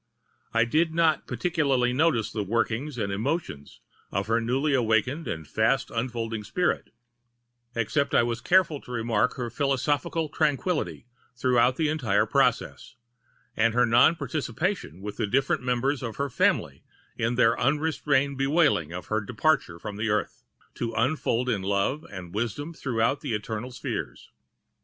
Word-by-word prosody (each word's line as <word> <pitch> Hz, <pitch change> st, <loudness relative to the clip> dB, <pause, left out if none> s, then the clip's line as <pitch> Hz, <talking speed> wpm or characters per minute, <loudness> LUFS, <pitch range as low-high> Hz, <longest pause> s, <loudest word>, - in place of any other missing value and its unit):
I 115 Hz, 0 st, +3 dB
did 160 Hz, +6 st, +1 dB
not 160 Hz, -3 st, +2 dB
particularly 140 Hz, -8 st, +1 dB
notice 140 Hz, -5 st, +2 dB
the 110 Hz, -, -2 dB
workings 115 Hz, +6 st, -1 dB
and 100 Hz, -3 st, -2 dB
emotions 105 Hz, -, -3 dB, 0.3 s
of 95 Hz, +1 st, -1 dB
her 115 Hz, +1 st, +1 dB
newly 135 Hz, +6 st, 0 dB
awakening 125 Hz, +5 st, +1 dB
and 80 Hz, -2 st, -5 dB
fast 115 Hz, -, +1 dB
unfolding 115 Hz, -2 st, -3 dB
spirit, 180 Hz, +11 st, -1 dB, 0.9 s
except 140 Hz, +5 st, 0 dB
that -, -, +2 dB
I -, -, +5 dB
was 115 Hz, 0 st, -2 dB
careful 175 Hz, -2 st, +3 dB
to -, -, -12 dB
remark 115 Hz, -3 st, 0 dB
her 120 Hz, -3 st, -4 dB
philosophical 145 Hz, +4 st, 0 dB
tranquillity 150 Hz, -, -1 dB, 0.3 s
throughout 125 Hz, 0 st, +3 dB
the 160 Hz, +1 st, +1 dB
entire 125 Hz, -10 st, +1 dB
process, -, -, 0 dB, 0.6 s
and 115 Hz, +1 st, +2 dB
her 125 Hz, 0 st, +5 dB
non 120 Hz, +8 st, +5 dB
participation 155 Hz, -, -3 dB
with 105 Hz, +1 st, -6 dB
the -, -, 0 dB
different 135 Hz, +6 st, +1 dB
members 125 Hz, +3 st, 0 dB
of 115 Hz, -3 st, -5 dB
her 140 Hz, -1 st, -2 dB
family -, -, +1 dB, 0.3 s
in 115 Hz, +1 st, -1 dB
their 115 Hz, -1 st, +4 dB
unrestrained 140 Hz, -1 st, +1 dB
bewailing 140 Hz, -, +2 dB
of 90 Hz, +1 st, -6 dB
her 110 Hz, 0 st, -1 dB
departure 130 Hz, -, 0 dB
from 105 Hz, +3 st, -7 dB
the 110 Hz, +1 st, -1 dB
earth, 105 Hz, 0 st, -1 dB, 0.3 s
to 115 Hz, -1 st, -4 dB
unfold 125 Hz, -1 st, +1 dB
in 110 Hz, -6 st, 0 dB
Love 100 Hz, +11 st, -1 dB
and 90 Hz, -3 st, -8 dB
Wisdom 120 Hz, +9 st, -3 dB
throughout 125 Hz, -2 st, -1 dB
eternal 110 Hz, +2 st, -3 dB
spheres. -, -, -5 dB
125 Hz, 145 wpm, -26 LUFS, 110-145 Hz, 0.9 s, I